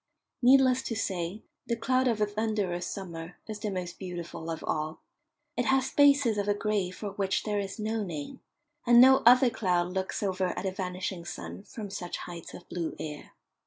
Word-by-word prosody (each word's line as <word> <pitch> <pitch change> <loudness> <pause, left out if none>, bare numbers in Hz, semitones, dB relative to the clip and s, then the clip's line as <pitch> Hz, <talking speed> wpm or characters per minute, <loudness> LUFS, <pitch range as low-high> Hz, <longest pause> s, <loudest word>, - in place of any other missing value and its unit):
Needless 260 0 +6
to 235 - -4
say, 190 -1 -3 0.2
the 235 - +1
cloud 255 +3 +1
of 230 -3 +1
a 210 - +4
thunderous 205 -4 -1
summer 170 -3 -7
is 215 -1 -5
the 210 0 -2
most 180 -3 -5
beautiful 170 -3 -6
of 165 -1 -4
all. 155 +1 -2 0.5
It 245 - 0
has 265 +1 +2
spaces 280 -6 +5
of 205 - -1
a 205 - +2
grey 205 -3 0
for 200 +3 -6
which 195 -1 -1
there 210 -1 -1
is 195 -1 -4
no 220 +1 -1
name, 165 - -6 0.5
and 240 0 +8
no 265 +2 +9
other 250 0 +7
cloud 180 -4 0
looks 190 +2 -2
over 185 -2 -1
at - - -3
a 190 - 0
vanishing 185 -1 -4
sun 175 - -7
from 210 -1 -7
such 180 -3 -4
heights 170 -2 -8
of 175 - -12
blue 170 -2 -3
air. 150 -1 -7
200 Hz, 190 wpm, -29 LUFS, 180-225 Hz, 0.5 s, no